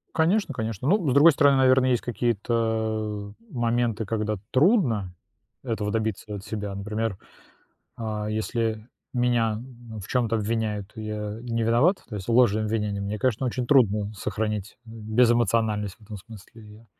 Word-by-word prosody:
Конечно 170 +1 +2
конечно. 115 0 -3
Ну, 180 -3 +3
с - - +2
другой 145 +5 +8
стороны, 140 -1 +4
наверно, 130 0 +4
есть 125 -2 +2
какие-то 110 -3 -1 0.2
моменты, 120 - 0
когда 110 0 -1 0.2
трудно 130 - +3 0.5
этого 110 -5 -2
добиться 110 -1 -2
от 100 - -7
себя. 105 -3 -4
Например, 105 +1 -3 0.8
а, 110 -2 -3
если 110 0 -2 0.3
меня 120 -3 +1
ну, 120 -2 -11
в 100 - -8
чём-то 115 -3 +1
обвиняют, 110 -2 -2
и 110 - -6
я 105 0 -4
не 115 -1 -2
виноват, 120 - +3
то 110 - -8
есть 95 -2 -7
ложные 115 -3 +4
обвинения, 105 -2 -1
мне, 100 +2 -3
конечно, 130 +1 0
очень 125 0 -2
трудно 105 -6 +3
сохранить, 105 0 -3
э, - - -15
безэмоциональность 110 -2 +1
в - - -39
этом 105 0 -8
смысле. 110 +2 -13
Я 105 +2 -15
110 Hz, 150 wpm, -25 LUFS, 105-120 Hz, 0.8 s, другой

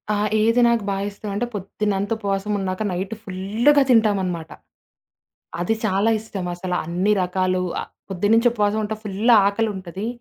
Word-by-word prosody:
ఆ! - - 0 0.2
ఏది 230 +3 +3
నాకు 235 -2 +2
బా 195 - 0
ఇష్టమంటే, 205 +2 -4
పొద్దున్నంత 200 0 -2
ఉపవాసం 200 -1 -2
ఉన్నాక 185 +1 -3
నైట్ 190 +4 -3
ఫుల్లుగా 215 +9 +2
తింటామనమాట. 190 -8 +2 1.1
అది 200 +6 +1
చాలా 200 +2 +2
ఇష్టం. 205 -4 -6
అసల 180 +1 -4
అన్ని 180 +5 0
రకాలు 185 0 0 0.2
ఆహ్, - - -9 0.2
పొద్దున్నుంచి 220 +6 +3
ఉపవాసం 210 -1 +1
ఉంట 215 +1 -3
ఫుల్లు 210 +4 +2
ఆకలుంటది. 200 -2 -2
200 Hz, 135 wpm, -22 LUFS, 185-220 Hz, 1.1 s, ఏది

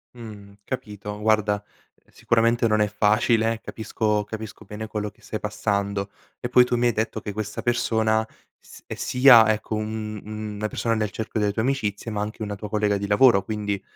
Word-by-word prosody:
Mh, 105 -4 -11
capito. 105 -4 -6
Guarda 105 -1 +1 0.5
sicuramente 115 0 +2
non 110 -1 +2
è 105 - +3
facile, 110 +2 +2
capisco 110 -1 -1
capisco 110 0 -8
bene 105 +2 -7
quello 105 -1 -3
che - - -25
stai 110 - -6
passando 100 -1 -2 0.3
e - - -3
poi 125 0 +6
tu 125 0 -1
mi 120 - +1
hai 120 - +2
detto 110 +1 -2
che 105 -1 -6
questa 105 0 -4
persona 110 -2 +1 0.3
s - - -16
è - - -5
sia, 125 -4 +6
ecco 110 0 -3
un 110 -1 -4 0.3
una 105 +1 -2
persona 115 +1 -1
nel 110 -2 -1
cerchio 110 0 -4
delle 105 -1 +2
tue 110 +2 -1
amicizie 115 -5 -2
ma 105 -1 -2
anche 110 +2 -4
una 105 -1 -4
tua 105 +1 -7
collega 105 -1 +1
di 100 0 -4
lavoro, 105 -1 +5
quindi 105 -1 -3
110 Hz, 185 wpm, -24 LUFS, 105-115 Hz, 0.5 s, poi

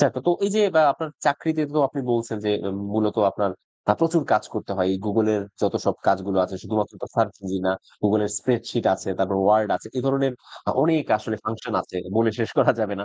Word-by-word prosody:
চা, 145 - +7
কতো 130 +7 0
এই 200 - +1
যে 215 - +4
বা 160 - +7
আপনার 160 +3 -5 0.2
চাকরিতে 155 +2 +1
তো - - +3
আপনি 140 - -5
বলছেন 115 -1 -1
যে, 105 - +1 0.4
মূলত 110 0 +1
আপনার 100 0 -1 0.4
আ - - +5
প্রচুর 165 -1 +3
কাজ 105 - +3
করতে 105 -2 -4
হয়। 90 - +1
এই 95 - -2
গুগলের 105 0 +2 0.2
যতসব - - +1
কাজগুলো 95 0 +2
আছে, 95 - -7
শুধুমাত্র 105 -2 -2
তো - - -3
সার্চ 110 -3 +2
ইঞ্জিন 95 -1 -3
না, - - +3 0.3
গুগলের 105 0 +2
স্প্রেডশিট 120 +2 -1
আছে, 95 - -8
তারপর 95 0 +1
ওয়ার্ড 105 +1 +5
আছে। - - -13
এ - - +1
ধরনের 135 0 +2 0.4
অ - - +4
অনেক 155 -1 +3
আসলে 110 0 -4
ফাংশন 110 0 -4
আছে। - - -10 0.2
বলে 115 0 +4
শেষ 115 - -1
করা - - +6
যাবে 105 -2 -1
না। - - -4
110 Hz, 210 wpm, -23 LUFS, 100-135 Hz, 0.4 s, চা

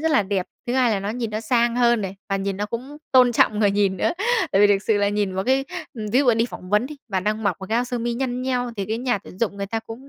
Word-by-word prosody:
rất 320 +1 +1
là 275 -9 +4
đẹp, 190 -2 -2 0.2
thứ 240 - -1
hai 255 -2 +3
là 205 -3 0
nó 200 +2 -3
nhìn 230 -1 -3
nó 215 - -3
sang 235 +1 +1
hơn 240 -2 +3
này, 195 -1 -5
và 195 - 0
nhìn 195 0 -2
nó 205 +1 -2
cũng 255 +6 -6 0.2
tôn 250 -2 +6
trọng 215 -2 +3
người 205 -2 +4
nhìn 200 -1 +1
nữa. 185 - +1 0.4
Tại 195 - +4
vì 205 - +8
thực 200 -1 +2
sự 210 -2 +2
là 205 - +2
nhìn 205 -2 -1
vào 190 +1 -2
cái 265 +2 +2 0.3
ừm, 220 -3 -5
ví 255 - +4
dụ 265 -4 +4
đi 230 +1 +1
phỏng 180 -6 -10
vấn 210 +4 +3
đi, 300 - -9
bạn 190 -2 -2
đang 215 +1 -1
mặc 200 -5 +1
một 190 - -6
cái 225 - 0
áo 240 - +2
sơ 245 -1 -3
mi 235 +1 -1
nhăn 250 0 -2
nheo 250 -2 -1
thì 200 - -2
cái 220 +2 -2
nhà 245 -4 0
tuyển 185 -1 -14
dụng 205 -3 -1
người 200 0 -3
ta 225 +3 -2
cũng 230 +5 -11
220 Hz, 320 wpm, -23 LUFS, 200-245 Hz, 0.4 s, vì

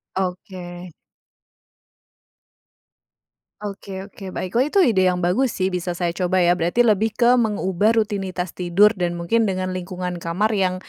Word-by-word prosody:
Oke. 180 -1 -5 2.7
Oke 195 -2 -6
oke, 190 -1 -9
baik. 185 +5 -3
Wah 255 - +4
itu 385 +6 +2
ide 205 - +3
yang 180 -1 +1
bagus 205 +8 +1
sih, 185 0 0
bisa 180 -1 -3
saya 175 0 -1
coba 180 +1 0
ya, 175 0 +3
berarti 175 +8 +1
lebih 220 -1 +2
ke 245 +2 +4
mengubah 210 -2 +1
rutinitas 195 -5 -1
tidur 180 +4 +4
dan 175 -1 -1
mungkin 175 +7 +1
dengan 185 -2 -2
lingkungan 180 -1 -4
kamar 170 +6 -1
yang 185 -1 +1
185 Hz, 145 wpm, -22 LUFS, 180-210 Hz, 2.7 s, Wah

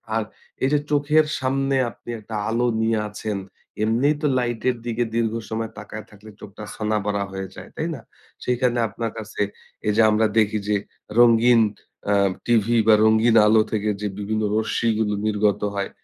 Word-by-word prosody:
আর 115 - +1 0.4
এইযে 145 +3 +3
চোখের 150 +2 +3
সামনে 135 +1 0
আপনি 115 - -14
একটা 110 +1 -8
আলো 120 +2 +1 0.2
নিয়ে 110 -1 +1
আছেন। 105 -1 -4 0.5
এমনিই 120 +7 +2
তো 150 - +2
লাইটের 120 0 0
দিকে 120 0 0
দীর্ঘ 115 -1 +1 0.2
সময় 110 0 -3
তাকায় 105 +1 -8
থাকলে 105 +1 -15
চোখটা 105 +1 -10
ছানাবড়া 105 -2 -1
হয়ে 95 0 -5
যায়। - - -10
তাই 160 - -2
না? 125 - -10 0.4
সেখানে 125 0 +1
আপনার 115 +2 -4
কাছে 110 -1 -6 0.5
এইযে 105 +2 +3
আমরা 110 +1 +3
দেখি 110 0 +3
যে 105 - +2 0.4
রঙিন 120 0 +6 0.5
আ - - +4 0.3
টিভি 120 0 +2
বা, 110 - +8
রঙিন 110 +1 +4
আলো 110 0 +5
থেকে 105 -1 0
যে 105 - -1
বিভিন্ন 110 +1 -2
রশ্মিগুলো 110 -1 0
নির্গত 105 -1 +1
হয়। 100 -1 -2
110 Hz, 155 wpm, -23 LUFS, 105-120 Hz, 0.5 s, বা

